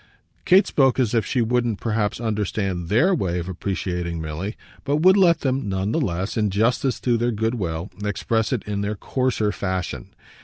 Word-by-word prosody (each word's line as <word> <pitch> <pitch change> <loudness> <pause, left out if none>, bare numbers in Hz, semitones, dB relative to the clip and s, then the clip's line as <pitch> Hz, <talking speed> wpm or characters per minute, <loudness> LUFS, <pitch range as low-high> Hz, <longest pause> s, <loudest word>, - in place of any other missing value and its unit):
Kate 190 +2 +6
spoke 135 -2 +2
as 125 -4 +1
if 115 -2 +1
she 125 - +1
wouldn't 120 -2 0
perhaps 110 -3 -1
understand 100 -5 -2
THEIR 140 - +4
way 90 - -1
of 85 0 -4
appreciating 90 -2 -3
Milly, 80 +7 -5 0.3
but 140 +1 0
would 185 +1 +7
let 170 -5 +4
them 130 -5 -1
none 95 +2 -1
the 165 - +1
less, 95 -3 -2
in 105 -2 +2
justice 120 +6 +1
to 120 -2 +2
their 120 +1 +1
good 110 +1 -1
will, 85 -4 -3
express 110 +2 -1
it 125 -5 -1
in 105 -1 -3
their 105 +1 -2
coarser 125 -2 0
fashion. 95 -3 -4
105 Hz, 185 wpm, -23 LUFS, 95-125 Hz, 0.3 s, would